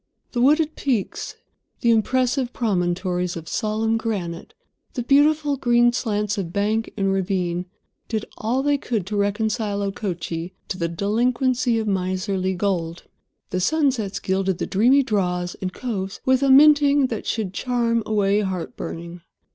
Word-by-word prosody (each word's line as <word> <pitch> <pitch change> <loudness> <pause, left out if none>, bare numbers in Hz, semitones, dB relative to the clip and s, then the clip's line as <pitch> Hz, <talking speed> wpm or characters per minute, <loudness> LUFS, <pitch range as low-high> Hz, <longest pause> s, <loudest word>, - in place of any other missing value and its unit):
The 240 - -1
wooded 305 +4 +3
peaks, 245 -9 -2 0.5
the 235 - +4
impressive 250 +3 +1
promontories 180 -4 -1
of 165 -1 -7
solemn 220 +4 0
granite, 190 -7 -4 0.4
the 245 - -2
beautiful 290 +2 +3
green 240 -1 +3
slants 210 -3 -1
of 170 -4 -4
bank 215 +4 0
and 195 -1 +1
ravine 180 -2 -1 0.4
did 220 -1 -2
all 245 +5 -1
they 290 0 +2
could 220 -9 -2
to 210 +2 -4
reconcile 205 0 0
Okochee 175 -3 -4 0.2
to 185 - -4
the 170 - 0
delinquency 235 +7 +1
of 220 - -1
miserly 190 0 -1
gold. 175 -3 -2 0.5
The 185 - 0
sunsets 255 - +1
gilded 190 -1 0
the - - -2
dreamy 250 +8 +4
draws 180 -6 -1
and 185 -1 -2
coves 195 -4 -4
with 260 0 +3
a 275 - +2
minting 290 0 +6
that 225 - -5
should 210 -5 -2
charm 235 +1 0
away 205 -1 +2
heart 190 -4 -3
burning. 170 +1 -7
210 Hz, 145 wpm, -23 LUFS, 185-245 Hz, 0.5 s, minting